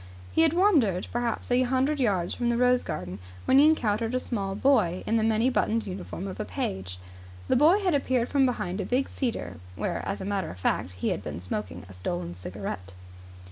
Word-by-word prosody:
He - - +3
had 325 -1 +4
wandered 295 - +3
perhaps 240 0 -2
a 245 +1 +4
hundred 265 +4 +1
yards 195 -8 +1
from 240 -1 -1
the 235 - +1
rose 250 0 +4
garden 90 +2 -5 0.3
when 265 - +5
he 295 - +7
encountered 230 -6 +1
a - - +2
small 200 -6 -3
boy 210 -8 +2
in 225 - +1
the 220 - +1
many 225 +2 +2
buttoned 230 -3 +1
uniform 190 0 -6
of 190 - -7
a - - 0
page. 90 0 -4 0.5
The - - +3
boy 325 +10 +5
had 365 -4 +1
appeared 260 -4 +1
from 275 -2 +3
behind 200 -5 -2
a - - -2
big 260 +2 +1
cedar, 240 - -3 0.2
where, - - -2
as 195 - -2
a 190 - -5
matter 195 -3 -1
of 90 - -9
fact, 90 0 0
he 90 - -2
had - - -2
been - - -6
smoking 90 0 -5
a 95 - -12
stolen 85 -1 -4
cigarette. 95 +1 -6
220 Hz, 210 wpm, -27 LUFS, 160-255 Hz, 0.5 s, he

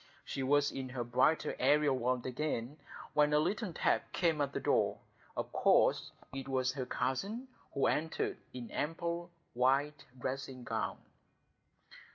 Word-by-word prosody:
She 135 - -3
was 145 +2 +3
in 130 -1 -5
her 125 -1 -3
brighter 125 +7 +2
aerial 150 -2 +4
world 125 0 0
again, 130 0 -2 0.4
when 150 0 +4
a 150 - +5
little 190 +5 0
tap - - +1
came 165 -4 +2
at 140 -1 0
the - - -2
door; - - +2 0.4
of - - -3
course - - +4 0.2
it 135 0 -5
was 130 -1 +1
her 130 -2 -4
cousin, 200 - -2 0.3
who 140 - +2
entered 160 +2 0
in 125 -2 -7
ample 170 +2 -2 0.2
white 140 +4 +2
dressing 130 0 -4
gown. - - -2
140 Hz, 145 wpm, -34 LUFS, 130-155 Hz, 0.4 s, a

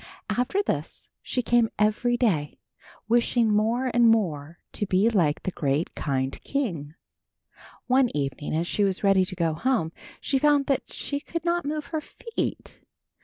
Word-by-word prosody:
After 250 +12 0
this, - - -4
she 250 - -2
came 235 -1 +3
every 215 +3 +2
day, 170 - 0 0.5
wishing 235 -1 +2
more 235 +5 +1
and 240 -1 +5
more 170 -8 0
to 205 - -3
be 195 +6 +3
like 165 -8 +1
the 185 - -2
great 145 0 -1
kind 135 -2 -2
king. 170 - -3 0.9
One 255 0 +3
evening 145 +2 -2
as 165 +2 0
she 205 - 0
was 195 0 0
ready 195 -2 +4
to 185 - -7
go 165 -3 0
home, 165 -2 0 0.3
she 270 - 0
found 290 -1 +3
that 275 -1 -1
she 285 - -4
could 335 +3 -6
not 345 -1 +1
move 300 +1 -3
her 315 - 0
feet. 460 +8 -5
220 Hz, 160 wpm, -26 LUFS, 165-260 Hz, 0.9 s, and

